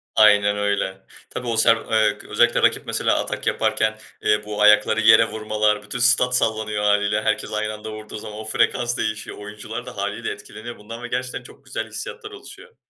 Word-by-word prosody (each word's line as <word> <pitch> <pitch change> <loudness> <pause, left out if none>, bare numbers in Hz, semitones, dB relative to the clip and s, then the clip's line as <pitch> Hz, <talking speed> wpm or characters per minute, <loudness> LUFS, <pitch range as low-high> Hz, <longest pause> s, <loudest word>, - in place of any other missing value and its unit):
Aynen 105 -1 +5
öyle. 100 -2 -2 0.2
Tabii, 125 - -6
o 115 -1 -1
se 115 - +4 0.2
eee, 110 -1 +3
özellikle - - +3
rakip - - +2
mesela - - 0
atak - - -4
yaparken, 110 0 +1 0.2
eee, 105 0 +1
bu 105 0 -4
ayakları 105 +1 +5
yere 110 +1 +7
vurmalar, 110 -1 0
bütün 105 +4 -6
stat 125 0 +4
sallanıyor 110 -2 0
hâliyle. 105 0 +2
Herkes 110 0 -1
aynı 110 0 -2
anda 105 +1 -8
vurduğu 110 0 -8
zaman 105 0 -8
o 110 - -7
frekans 120 +2 0
değişiyor. 110 -1 -3
Oyuncular 105 +1 -7
da - - -10
hâliyle - - -3
etkileniyor 120 +2 -9
bundan 115 +3 -10
ve - - -4
gerçekten 125 +1 -4
çok - - -16
güzel - - -4
hissiyatlar 460 -3 -7
oluşuyor. 465 +3 -13
110 Hz, 180 wpm, -22 LUFS, 105-115 Hz, 0.2 s, yere